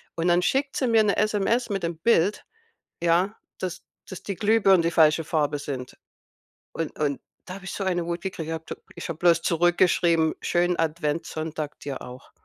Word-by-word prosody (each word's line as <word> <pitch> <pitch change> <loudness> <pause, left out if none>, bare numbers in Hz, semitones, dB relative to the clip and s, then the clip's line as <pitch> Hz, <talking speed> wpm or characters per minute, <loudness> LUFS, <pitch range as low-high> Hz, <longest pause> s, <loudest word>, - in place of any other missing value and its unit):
und 165 +1 -1
dann 175 0 +4
schickt 275 +8 0
sie 265 - 0
mir 225 -2 +5
'ne 200 - +2
SMS 215 +3 +1
mit 195 -3 -2
dem 170 0 -2
Bild, 200 +1 +2 0.6
ja, 175 +4 +2 0.2
dass 180 -1 -5 0.3
dass 185 - -8
die 200 - -4
Glühbirnen 205 -2 +4
die 165 0 +1
falsche 160 -1 +4
Farbe 150 -2 0
sind 130 -3 -6 0.7
und 165 -2 -5
und 145 -2 -1 0.3
da 185 - -7
habe 195 -1 -11
ich 190 - -5
so 200 - -3
eine 175 -3 0
Wut 170 0 -3
gekriegt. 185 -5 -5
Ich - - -2
habe 160 - -8
d - - -5 0.2
ich - - -7
habe 165 -1 -5
bloß 170 -1 +4
zurückgeschrieben, 170 -1 +3
schönen 175 0 +1
Adventssonntag 155 -1 -2
dir 140 -2 -5
auch. 125 +2 -11
170 Hz, 190 wpm, -25 LUFS, 160-190 Hz, 0.7 s, mir